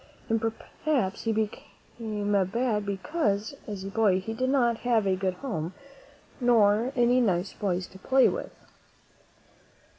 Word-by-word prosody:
And 225 -1 +1
perhaps 225 0 -2
he 225 - +2
became 215 0 -4 0.2
bad 215 -1 -1
be 200 -1 -1
cause, 210 - -1
as 205 -3 -5
a 195 - -5
boy, 200 -3 +3
he 220 +4 -5
did 255 +3 -1
not 240 -4 +3
have 235 -4 +2
a 190 -1 +2
good 185 -1 -1
home 180 - -4 0.6
nor 230 -1 +4
any 245 +1 +4
nice 185 -4 0
boys 185 -2 -1
to 190 - -15
play 265 +6 +4
with. - - -3
220 Hz, 145 wpm, -27 LUFS, 195-240 Hz, 0.6 s, nor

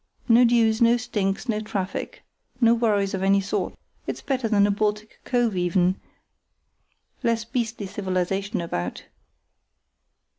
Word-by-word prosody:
No 240 +1 +6
dues, 230 -1 +3
no 235 +1 +5
stinks, 210 -2 -2
no 215 -3 0
traffic, 210 - -4 0.4
no 235 -2 +5
worries 210 -4 +1
of 190 - -2
any 195 +1 +4
sort. 195 -1 -2 0.3
It's - - -3
better 260 -4 -1
than 205 -2 +4
a 205 - +2
Baltic 210 +1 -2
cove 240 -5 +1
even, 180 +1 +1 1.2
less 230 -3 +1
beastly 225 -3 -3
civilization 195 +1 -2
about. 90 - -4
210 Hz, 125 wpm, -24 LUFS, 195-230 Hz, 1.2 s, No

